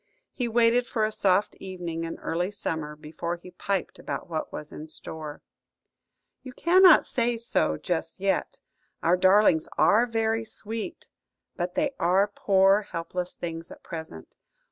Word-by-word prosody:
He 245 - -2
waited 235 +1 +3
for 220 - -1
a 215 - +1
soft 200 -1 +2
evening 175 -3 -5
in 165 - -5
early 175 +3 -2
summer 160 -7 -4
before 155 +3 -5
he 175 +1 -13
piped 190 +1 -3
about - - -5
what 160 -2 -4
was 150 - -7
in 155 - -8
store. 155 -1 -7 1.0
"You 255 - -10
cannot 365 +2 +6
say 240 -2 0
so 80 - 0
just 165 - -3
yet. 195 0 -1 0.4
Our 170 +2 +4
darlings 185 -3 +4
are 230 +4 +5
very 225 -1 0
sweet, 225 +7 -6 0.5
but 180 0 -3
they 290 -1 +1
are 185 +4 +3
poor 195 +1 +4
helpless 180 -2 -5
things 165 -1 -6
at - - -13
present. 160 - -8
185 Hz, 145 wpm, -27 LUFS, 165-225 Hz, 1.0 s, cannot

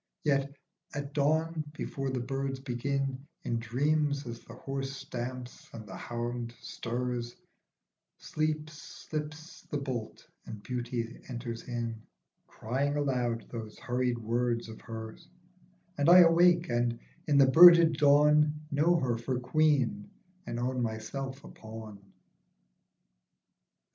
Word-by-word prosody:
Yet 140 -2 +1 0.4
at 145 - -2
a - - -11
dawn 155 +3 0
before 135 -3 -4
the 130 -1 -2
birds 135 +1 -3
begin, 135 +1 -2 0.2
In 115 -1 -1
dreams, 145 +4 0
as 115 -1 -6
the 115 - -13
horse 135 +1 -4
stamps 125 -1 -7
and 110 -1 -8
the 95 -2 -9
hound 120 0 -4
stirs, 120 0 -4 0.8
Sleep 155 0 -2
slips 155 +1 -7
the 150 - -1
bolt 130 -6 -5 0.2
and 105 -2 -8
beauty 120 -2 -4
enters 120 -2 -5
in 115 -2 -4 0.5
Crying 135 +6 -2
aloud 125 -5 -1
those 110 -3 -7
hurried 125 -2 -1
words 115 +1 -1
of 110 - -10
hers, 110 -1 -8 0.7
And 145 +3 +4
I 180 +1 +10
awake 170 0 +5
and, 120 -1 0 0.3
in 145 -2 +3
the 140 - +8
birded 165 +2 +8
dawn, 150 +1 +4
Know 155 +5 +3
her 125 -8 0
for 125 +1 -2
Queen, 155 - +1 0.4
and 120 - -3
own 125 +1 -1
myself 130 +5 -4
a - - -10
pawn. 110 -2 -10
130 Hz, 125 wpm, -30 LUFS, 120-150 Hz, 0.8 s, I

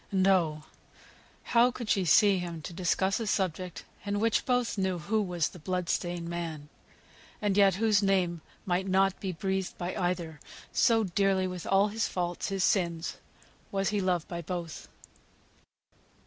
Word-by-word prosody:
And 190 -1 +2
oh! 165 -6 +2 0.8
how 240 +1 +4
could 240 -2 -6
she 195 -3 +2
see 200 +3 +5
him 170 -3 -6
to 175 - -7
discuss 190 +3 +1
a 225 - -3
subject 185 -3 -2 0.2
in 205 0 -1
which 225 +1 +1
both 250 -2 +1
knew 190 -3 0
who 210 +7 0
was 175 -5 -1
the 180 - -13
blood 180 +2 -2
stained 175 -1 -2
man; 165 -4 -5 0.7
and 205 -2 0
yet 195 -2 +5
whose 215 0 +3
name 185 -4 +1 0.2
might 185 +1 0
not 190 0 +2
be 190 - -3
breathed 190 +2 -2
by 175 +1 -4
either, 175 -5 -2 0.3
so 225 -1 +3
dearly 195 0 +1
with 180 -2 -5
all 195 +2 +4
his 220 +1 -1
faults, 175 0 -3
his 195 -1 -1
sins, 170 -4 0 0.5
was 195 -1 0
he 205 -1 0
loved 180 -3 0
by 170 -1 -5
both. 170 -1 -6
185 Hz, 160 wpm, -29 LUFS, 175-200 Hz, 0.8 s, see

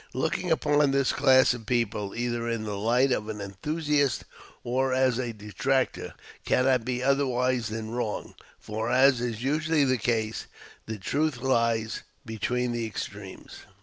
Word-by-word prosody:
Looking 180 - -1
upon 150 -2 +3
this 135 -1 +2
class 130 -1 +5
of 115 -3 -9
people, 110 -4 -1
either 120 0 -2
in 115 -2 -2
the 105 -1 -4
light 120 +6 +2
of 110 -3 -1
an 105 -1 -5
enthusiast 145 - -1 0.4
or 130 +2 0
as 130 -2 +2
a 120 -2 -2
detractor, 115 +5 -2 0.3
cannot 130 -2 +2
be 125 0 -2
otherwise 130 -3 +1
than 110 0 -5
wrong; 115 -3 -3 0.3
for, 110 +2 -4
as 130 0 +4
is 120 -1 -3
usually 155 +2 +2
the 130 -2 +1
case, 110 -1 -1 0.4
the 110 -1 -4
truth 140 +8 -1
lies 115 -3 0 0.2
between 120 +2 -1
the 120 -1 -2
extremes. 100 -2 -8
120 Hz, 150 wpm, -27 LUFS, 110-135 Hz, 0.4 s, class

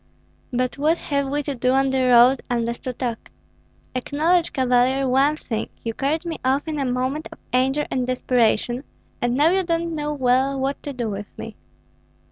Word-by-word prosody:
"But 255 +2 -1
what 315 +4 +3
have 280 -3 -1
we 290 +1 -1
to 285 - -3
do 255 0 +1
on 270 0 +2
the 265 -1 +1
road 250 +2 +6
unless 235 -1 -1
to 255 - -5
talk? 235 -2 -4 0.6
Acknowledge, 315 +7 +1
Cavalier, 260 +1 +2
one 270 +4 +3
thing: 225 -7 -4
you 230 - -2
carried 295 +7 -1
me 335 -1 -4
off 270 +4 +1
in 305 -2 -2
a 275 - 0
moment 255 +4 -1
of - - -11 0.2
anger 265 +4 +2
and 255 -1 -1
desperation, 250 0 +1 0.4
and 240 0 +1
now 300 +5 +4
you 380 +1 +2
don't 335 -1 -1
know 300 -1 -2
well 265 0 +1
what 270 +1 -2
to 290 - -5
do 245 -4 -3
with 205 -1 -5
me." 225 -2 -7
265 Hz, 185 wpm, -22 LUFS, 250-295 Hz, 0.6 s, road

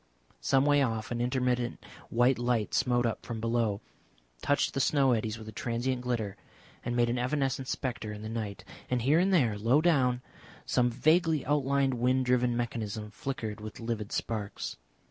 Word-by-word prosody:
Some 135 - +3
way 145 -1 +4
off 115 -4 -1
an 120 0 -1
intermittent 125 -1 0 0.3
white 120 +2 +3
light 120 -3 0
smote 120 -1 +2
up 115 - -2
from 115 -2 -5
below, 115 -3 0 0.6
touched 145 - +1
the 135 - -1
snow 135 -1 +3
eddies 110 -1 0
with 110 -1 -10
a - - -6
transient 120 +3 -2
glitter, 115 -5 -2 0.5
and 120 0 -2
made 120 -1 +3
an 120 +1 0
evanescent 135 0 -1
spectre 120 -5 -3
in 105 0 -7
the - - -4
night; 110 -3 -5 0.2
and 125 -2 0
here 145 +6 +4
and 190 +2 +3
there, 120 - +3
low 120 +7 +4
down, 130 -7 +2 0.4
some 125 0 +2
vaguely 155 +5 +2
outlined 140 -1 +2
wind 125 +2 +1
driven 125 -1 +2
mechanism 110 -3 -3
flickered 115 -5 -5
with 110 0 -8
livid 115 -3 -3
sparks. 105 -3 -3
120 Hz, 170 wpm, -30 LUFS, 115-130 Hz, 0.6 s, way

